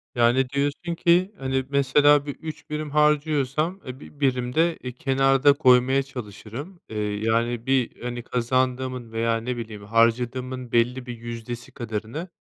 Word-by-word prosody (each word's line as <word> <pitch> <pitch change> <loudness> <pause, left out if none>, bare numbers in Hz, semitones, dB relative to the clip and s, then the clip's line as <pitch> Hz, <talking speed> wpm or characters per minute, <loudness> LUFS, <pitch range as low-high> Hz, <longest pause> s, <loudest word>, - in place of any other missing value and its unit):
Yani, 120 +2 +3
diyorsun 145 +5 -2
ki, 180 +3 +3
hani, 130 0 -1
mesela 145 +1 +4
bir 145 - -5
3 155 -2 -9
birim 150 -1 -4
harcıyorsam, 150 +3 +1
eee, 130 +1 -7
bi 145 - -14
birim 125 -2 0
de, 165 +1 +2
eee, 125 - -4
kenarda 135 0 +3
koymaya 130 -1 +4
çalışırım, 130 - -8
eee, 110 - -6 0.3
yani 115 +1 0
bir 130 -2 0
hani, 120 -1 -4
kazandığımın 125 0 -1
veya 115 0 0
ne 120 +2 -4
bileyim, 110 -3 -7
harcadığımın 120 +3 0
belli 125 +2 +1
bir 120 -2 -7
yüzdesi 120 +1 -7
kadarını, 115 - -5
130 Hz, 145 wpm, -24 LUFS, 120-145 Hz, 0.3 s, mesela